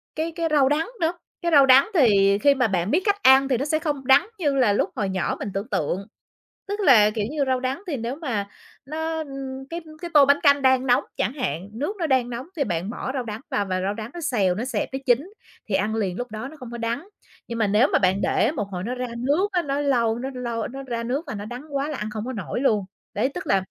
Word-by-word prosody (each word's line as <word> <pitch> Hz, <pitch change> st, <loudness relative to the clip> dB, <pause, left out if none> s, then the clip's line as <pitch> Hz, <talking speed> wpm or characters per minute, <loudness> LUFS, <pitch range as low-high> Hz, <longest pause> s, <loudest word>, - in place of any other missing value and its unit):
cái 320 Hz, +2 st, -2 dB
cái 335 Hz, -1 st, 0 dB
rau 280 Hz, -3 st, +4 dB
đắng 310 Hz, +3 st, +1 dB
nữa, 330 Hz, +2 st, +2 dB, 0.3 s
cái 340 Hz, -1 st, 0 dB
rau 280 Hz, -3 st, +7 dB
đắng 270 Hz, +8 st, +6 dB
thì 200 Hz, -, +4 dB
khi 280 Hz, +4 st, +4 dB
mà 250 Hz, -3 st, +2 dB
bạn 185 Hz, 0 st, -1 dB
biết 355 Hz, -, +3 dB
cách 405 Hz, 0 st, +1 dB
ăn 265 Hz, +1 st, +7 dB
thì 255 Hz, -, +2 dB
nó 275 Hz, -, -2 dB
sẽ 310 Hz, +1 st, +1 dB
không 290 Hz, -4 st, -3 dB
đắng 340 Hz, +8 st, +6 dB
như 290 Hz, -5 st, +1 dB
là 240 Hz, -6 st, +3 dB
lúc -, -, +1 dB
hồi 205 Hz, -5 st, -1 dB
nhỏ 190 Hz, -1 st, -1 dB
mình 205 Hz, -, -4 dB
tưởng 200 Hz, +6 st, -4 dB
tượng. 185 Hz, +7 st, -2 dB, 0.6 s
Tức 410 Hz, +1 st, -3 dB
là, 225 Hz, -, +6 dB
kiểu 210 Hz, -1 st, -2 dB
như, 295 Hz, -2 st, 0 dB
rau 260 Hz, -1 st, +1 dB
đắng 265 Hz, +8 st, -3 dB
thì 310 Hz, -6 st, -2 dB
nếu 235 Hz, +4 st, -4 dB
mà 225 Hz, -11 st, -3 dB, 0.4 s
nó, 320 Hz, +2 st, -3 dB
ưm, 270 Hz, -3 st, -6 dB
cái 340 Hz, +1 st, -4 dB, 0.2 s
cái 345 Hz, -, -5 dB
tô 290 Hz, -2 st, +8 dB
bánh 280 Hz, +1 st, +4 dB
canh 280 Hz, -1 st, +5 dB
đang 260 Hz, 0 st, +3 dB
nóng 250 Hz, +3 st, +3 dB
chẳng 210 Hz, -, 0 dB
hạn, 190 Hz, -, -3 dB
nước 295 Hz, -, -3 dB
nó 330 Hz, -, 0 dB
đang 255 Hz, -3 st, +1 dB
nóng 240 Hz, +4 st, -5 dB
thì 280 Hz, -, +1 dB
bạn 180 Hz, -1 st, -2 dB
bỏ 260 Hz, +2 st, -4 dB
rau 255 Hz, -3 st, -2 dB
đắng 215 Hz, 0 st, -6 dB
vào 200 Hz, -1 st, 0 dB
và 185 Hz, -1 st, -1 dB
rau 195 Hz, +2 st, -1 dB
đắng 220 Hz, +1 st, -7 dB
nó 345 Hz, -, -6 dB
xèo, 200 Hz, -, +1 dB
nó 220 Hz, -, -3 dB
xẹp, 255 Hz, -, -2 dB
nó 265 Hz, -, -2 dB
chín 275 Hz, -, +2 dB, 0.4 s
thì 195 Hz, -, -2 dB
ăn 210 Hz, +3 st, +1 dB
liền 195 Hz, -4 st, -1 dB
lúc 245 Hz, -2 st, -5 dB
đó 220 Hz, +5 st, -5 dB
nó 310 Hz, -, -12 dB
không 250 Hz, -4 st, -10 dB
có 235 Hz, -, -6 dB
đắng, 235 Hz, -, -3 dB, 0.4 s
nhưng 235 Hz, 0 st, -4 dB
mà 215 Hz, -, +2 dB
nếu 215 Hz, +7 st, +4 dB
mà -, -, +5 dB
bạn 190 Hz, +1 st, +2 dB
để 245 Hz, -, +2 dB
một 210 Hz, -, -2 dB
hồi 180 Hz, 0 st, -4 dB
nó 245 Hz, +3 st, -3 dB
ra 250 Hz, 0 st, -3 dB
nước 295 Hz, +11 st, +1 dB
á, 355 Hz, -2 st, +1 dB
nó 280 Hz, -1 st, -2 dB
lâu 235 Hz, -5 st, +1 dB
nó 265 Hz, +2 st, -4 dB
lâu 235 Hz, -3 st, -3 dB
nó 270 Hz, +2 st, -7 dB
ra 235 Hz, -3 st, -4 dB
nước 270 Hz, +8 st, -3 dB
là -, -, -4 dB
nó 205 Hz, 0 st, -5 dB
đắng 245 Hz, +5 st, -7 dB
quá 280 Hz, +2 st, 0 dB
là 300 Hz, -, -4 dB
ăn 210 Hz, +1 st, -4 dB
không 215 Hz, 0 st, -5 dB
có 260 Hz, -, -3 dB
nổi 215 Hz, +2 st, -4 dB
luôn. 215 Hz, -7 st, +2 dB, 0.3 s
Đấy, 220 Hz, +6 st, +1 dB
tức -, -, -6 dB
là -, -, +3 dB
255 Hz, 275 wpm, -24 LUFS, 215-285 Hz, 0.6 s, tô